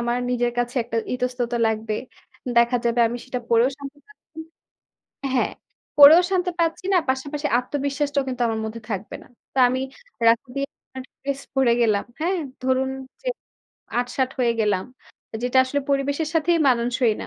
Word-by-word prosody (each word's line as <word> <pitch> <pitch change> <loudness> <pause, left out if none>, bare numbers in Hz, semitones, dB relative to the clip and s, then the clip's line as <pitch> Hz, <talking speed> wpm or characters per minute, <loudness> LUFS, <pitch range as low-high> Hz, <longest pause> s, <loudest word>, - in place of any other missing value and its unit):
আমার 240 +1 0
নিজের 240 -1 0
কাছে 245 +1 -1
একটা 230 0 -4 0.2
ইতস্ততা 245 -1 -2
লাগবে, 220 0 -1 0.6
দেখা 235 +1 +5
যাবে, 235 0 +2
আমি 235 - -4
সেটা 255 -1 -4
পরেও 235 +2 +5
শান্তি 280 +1 -9
পাচ্ছি 425 -6 -19 0.6
না 275 - -8
হ্যাঁ, 250 - +1 0.5
পরেও 295 +4 +10
শান্তি 360 -1 +1
পাচ্ছি 330 +2 0
না, - - +6
পাশাপাশি 285 +3 -1
আত্মবিশ্বাসটাও 280 +2 -1
কিন্তু 250 -1 -3
আমার 225 -1 -1
মধ্যে 220 +1 -6
থাকবে 200 0 -4
না। - - -19 0.3
তো - - -8
আমি 255 +1 -1 0.5
রাত্রি 235 +3 +3
তে - - -1 0.4
একটা - - -3 0.2
ড্রেস 275 0 -3
পড়ে 265 -3 +4
গেলাম 215 -3 +2 0.2
হ্যাঁ? 365 +4 +1 0.2
ধরুন 260 +1 +1 0.3
যে - - -9 0.7
আট-ষাট 250 +1 -1
হয়ে 240 -2 +3
গেলাম। 205 -3 +1 0.6
যেটা 250 +1 +2
আসলে 285 +2 -1
পরিবেশের 280 +3 0
সাথেই 330 +1 +3
মানানসই 240 -1 +2
না, - - -7
255 Hz, 160 wpm, -23 LUFS, 235-280 Hz, 0.7 s, পরেও